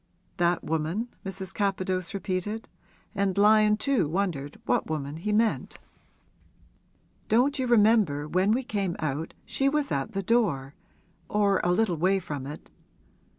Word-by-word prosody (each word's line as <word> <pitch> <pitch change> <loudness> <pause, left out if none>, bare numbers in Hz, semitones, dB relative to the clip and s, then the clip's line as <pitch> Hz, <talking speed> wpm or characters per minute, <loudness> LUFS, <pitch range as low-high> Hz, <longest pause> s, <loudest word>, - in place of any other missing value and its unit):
'That 175 -1 +1
woman?' 160 +9 -2
Mrs. 190 -1 -6
Capadose 185 -3 -1
repeated; 200 +3 -3 0.5
and 200 -2 0
Lyon 210 +1 +5
too 245 - +1
wondered 155 -5 -2
what - - 0
woman 150 -1 -3
he 205 +6 -3
meant. 220 +1 +1 1.5
'Don't 260 +6 +3
you 255 - 0
remember 210 -10 +3
when 185 +6 +2
we 250 +4 +1
came 200 -7 -2
out, 155 +1 -3
she 275 0 +1
was 295 -1 -1
at 135 -1 -2
the 195 0 -2
door 180 - +1 0.6
or 200 -2 +2
a 175 - +2
little 180 -2 +1
way 185 +5 +2
from 145 -7 -5
it? 150 +2 -9
195 Hz, 140 wpm, -27 LUFS, 165-215 Hz, 1.5 s, Lyon